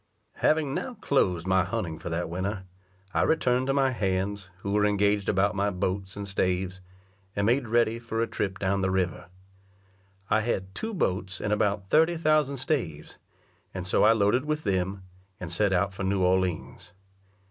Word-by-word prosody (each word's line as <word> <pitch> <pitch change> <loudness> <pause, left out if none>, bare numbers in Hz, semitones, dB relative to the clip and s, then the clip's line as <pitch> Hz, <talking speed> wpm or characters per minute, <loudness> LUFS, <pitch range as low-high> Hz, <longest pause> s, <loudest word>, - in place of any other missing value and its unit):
Having 155 -3 +2
now 250 - -3
closed 90 - +1
my 95 -1 +3
hunting 85 -3 -3
for - - -6
that 85 +1 -2
winter, 95 +4 -3 0.5
I - - +2
returned 130 -5 +2
to 135 - +2
my 135 -1 +3
hands, 100 -2 -2
who 100 - -3
were 105 0 +2
engaged 105 -1 +2
about 95 +1 +2
my 100 +1 +1
boats 95 0 -3
and 100 -1 -5
staves, 95 -1 -1 0.5
and 100 - +1
made 120 +3 +2
ready 115 0 +2
for 115 -1 -4
a 115 - +2
trip 95 -4 -3
down 100 0 0
the 95 - +1
river. 95 -2 -1 1.0
I 105 +3 +2
had 95 -4 -2
two 220 - -4
boats 95 - -1
and 105 0 0
about 100 -2 0
thirty 160 +2 +4
thousand 155 -3 +2
staves, 115 - -2 0.6
and 90 -1 -4
so 90 - +2
I 110 +2 +7
loaded 110 +4 +2
with 150 0 -2
them, 95 -1 -1 0.4
and 90 -1 -5
set 100 +2 +2
out 95 +1 +1
for 95 - -5
New 95 0 +1
Orleans. 90 -1 -1
100 Hz, 175 wpm, -27 LUFS, 95-115 Hz, 1.0 s, I